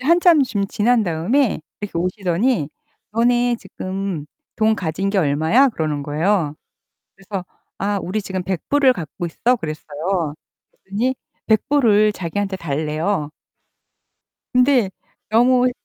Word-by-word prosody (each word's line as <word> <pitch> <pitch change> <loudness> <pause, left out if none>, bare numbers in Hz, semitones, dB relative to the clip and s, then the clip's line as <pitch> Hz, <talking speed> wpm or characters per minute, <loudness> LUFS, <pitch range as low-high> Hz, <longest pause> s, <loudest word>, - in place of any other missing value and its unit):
한참 335 +2 +5
좀 205 -6 -1
지난 230 +3 +2
다음에 185 - +1 0.2
이렇게 205 -4 -5
오시더니 185 - 0 0.4
"너네 240 +1 +2
지금 185 -7 -5 0.3
돈 220 0 +3
가진 190 +1 -2
게 200 - +1
얼마야?" 160 - +4
그러는 155 - -2
거예요. 155 +1 0 0.6
그래서 195 -1 -6 0.3
"아 200 0 -1
우리 205 +5 -2
지금 190 -2 -4
100 185 -2 -4
불을 275 -3 +5
갖고 170 -1 -5
있어." 245 +9 +1
그랬어요. 155 -1 -3 0.5
그랬더니 225 +7 -1 0.3
100 220 +2 +2
불을 215 -7 +4
자기한테 195 +2 -3
달래요. 155 +1 -2 1.2
근데 250 -5 +4 0.4
너무 250 +2 +4
195 Hz, 255 characters per minute, -20 LUFS, 165-240 Hz, 1.2 s, 한참